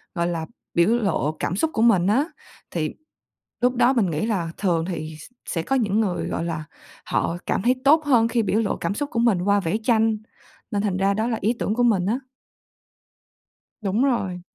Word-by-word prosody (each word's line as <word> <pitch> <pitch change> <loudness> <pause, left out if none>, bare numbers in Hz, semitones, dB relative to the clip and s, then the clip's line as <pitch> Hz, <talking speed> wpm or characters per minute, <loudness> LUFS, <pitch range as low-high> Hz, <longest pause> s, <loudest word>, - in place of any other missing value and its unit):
gọi 170 -1 0
là, 165 -2 -2 0.3
biểu 170 +3 +4
lộ 200 - +1
cảm 175 - -1
xúc 320 +11 +1
của 220 - 0
mình 195 -6 +4
á, 250 +9 +3 0.5
thì 155 -3 -2 0.7
lúc 250 +1 +2
đó 245 +2 +4
mình 220 -9 +1
nghĩ 160 +6 -1
là 185 -7 -1
thường 170 -5 +1
thì 160 -3 -5
s - - -11 0.2
sẽ 165 - -2
có 270 - 0
những 215 -4 +1
người, 195 -5 -1
gọi - - -2
là, 160 -2 -3 0.4
họ 170 - -1
cảm - - 0
thấy 245 +4 +3
tốt 310 +3 +5
hơn 240 -6 +4
khi 230 0 +1
biểu 210 +1 +1
lộ 215 - -1
cảm - - -2
xúc 285 +6 -3
của 230 - -2
mình 225 -7 +3
qua 200 +2 +3
vẽ 185 +2 -1
tranh. 225 -2 +3 0.5
Nên 205 -3 0
thành 200 -3 0
ra 195 +1 +2
đó 220 +2 0
là 230 -2 -1
ý 215 +4 +2
tưởng 210 - -1
của 245 - +1
mình 205 -7 +3
á. 225 +5 +1 1.6
Đúng 210 +4 +1
rồi. 200 -10 0
205 Hz, 210 wpm, -23 LUFS, 175-235 Hz, 1.6 s, tốt